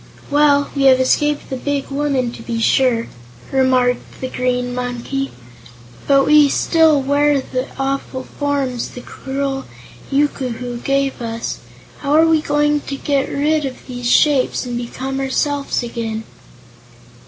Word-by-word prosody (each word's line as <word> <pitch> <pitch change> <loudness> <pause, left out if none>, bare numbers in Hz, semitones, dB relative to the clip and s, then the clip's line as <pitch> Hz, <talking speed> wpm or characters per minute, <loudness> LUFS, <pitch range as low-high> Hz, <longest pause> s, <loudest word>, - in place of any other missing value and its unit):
"Well, 285 -1 +3
we 275 -1 +1
have 260 -1 +6
escaped 295 +3 +1
the - - -1
big 280 +2 -2
woman, 275 -3 0
to - - -10
be 230 0 -3
sure," 235 0 +2 0.4
remarked 255 -2 +1
the 260 - -4
Green 250 -1 -1
Monkey, 250 +2 -3 0.8
"but 275 -1 +5
we 300 -1 +6
still 320 0 +3
wear 285 +1 +2
the 255 0 -3
awful 270 -1 -2
forms 275 -5 -2
the 250 - -9
cruel 270 +1 -4 0.5
yookoohoo 255 -4 -1
gave 275 -1 0
us. 230 0 -4 0.4
How 285 0 -1
are 320 +1 +6
we 320 -1 +3
going 295 0 +1
to 275 - -5
get 275 0 0
rid 300 +2 +1
of 265 -2 -6
these 245 -2 -4
shapes, 280 -2 +3
and 245 -1 -4
become 260 +3 -4
ourselves 275 0 -1
again?" 225 -2 -4
270 Hz, 140 wpm, -18 LUFS, 250-285 Hz, 0.8 s, have